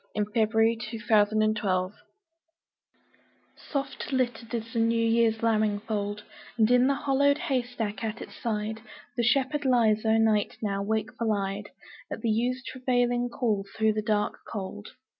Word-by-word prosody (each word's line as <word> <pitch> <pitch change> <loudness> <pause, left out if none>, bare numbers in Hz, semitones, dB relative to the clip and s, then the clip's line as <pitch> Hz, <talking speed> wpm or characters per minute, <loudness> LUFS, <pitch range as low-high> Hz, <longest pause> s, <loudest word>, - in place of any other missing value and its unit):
Dante 210 0 -1
Gabriel 225 0 +3
Rossetti 230 - -4 0.6
Spring 185 -3 -1 1.6
SOFT 275 0 -5
LITTERED 245 -3 -1
is 230 +1 -5
the 230 - 0
new 230 +1 +2
year's 230 -1 +2
lambing 215 -2 +2
fold, 205 -1 -3 0.3
And 220 +1 +4
in 250 +1 +5
the 280 - +2
hollowed 280 0 +2
haystack 240 -7 -2
at 225 0 -3
its - - -9
side 220 -1 -3 0.3
The 240 - 0
shepherd 275 +4 +2
lies 230 -5 +3
o' 220 0 +3
night 220 -2 +2
now, 200 -2 -2
wakeful 220 +2 -1
eyed 200 0 -2 0.4
At - - -5
the 230 - +1
ewes' 245 +3 0
travailing 245 -1 0
call 225 -5 0
through 220 -1 +3
the 215 - -1
dark 210 -1 0
cold. 205 0 -6
225 Hz, 145 wpm, -27 LUFS, 210-245 Hz, 1.6 s, in